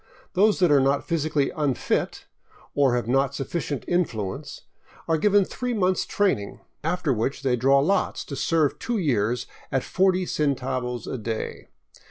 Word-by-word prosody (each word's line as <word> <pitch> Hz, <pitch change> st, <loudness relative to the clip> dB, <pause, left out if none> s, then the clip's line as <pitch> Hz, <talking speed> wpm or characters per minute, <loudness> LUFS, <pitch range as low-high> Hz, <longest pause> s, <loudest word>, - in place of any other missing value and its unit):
Those 205 Hz, +3 st, +4 dB
that 180 Hz, -4 st, +3 dB
are 145 Hz, -, +6 dB
not 135 Hz, +1 st, +1 dB
physically 155 Hz, -4 st, 0 dB
unfit, 145 Hz, -5 st, -1 dB, 0.5 s
or 135 Hz, -4 st, +3 dB
have 120 Hz, -2 st, -1 dB
not 135 Hz, +2 st, +1 dB
sufficient 145 Hz, 0 st, -3 dB
influence, 110 Hz, -, -2 dB, 0.5 s
are 165 Hz, -, +3 dB
given 205 Hz, +2 st, +4 dB
three 250 Hz, +3 st, -3 dB
months 185 Hz, -3 st, +1 dB
training, 185 Hz, -, 0 dB, 0.2 s
after 165 Hz, -3 st, 0 dB
which 125 Hz, +5 st, -2 dB
they 130 Hz, -2 st, +2 dB
draw 135 Hz, +3 st, +4 dB
lots 160 Hz, +9 st, +1 dB
to 140 Hz, -, -6 dB
serve 155 Hz, -1 st, +1 dB
two 240 Hz, -1 st, -2 dB
years 120 Hz, -, 0 dB, 0.3 s
at 135 Hz, -1 st, +1 dB
40 185 Hz, -1 st, +2 dB
centavos 130 Hz, -6 st, -1 dB
a 130 Hz, -, -4 dB
day. 110 Hz, 0 st, -4 dB
140 Hz, 150 wpm, -25 LUFS, 125-180 Hz, 0.5 s, are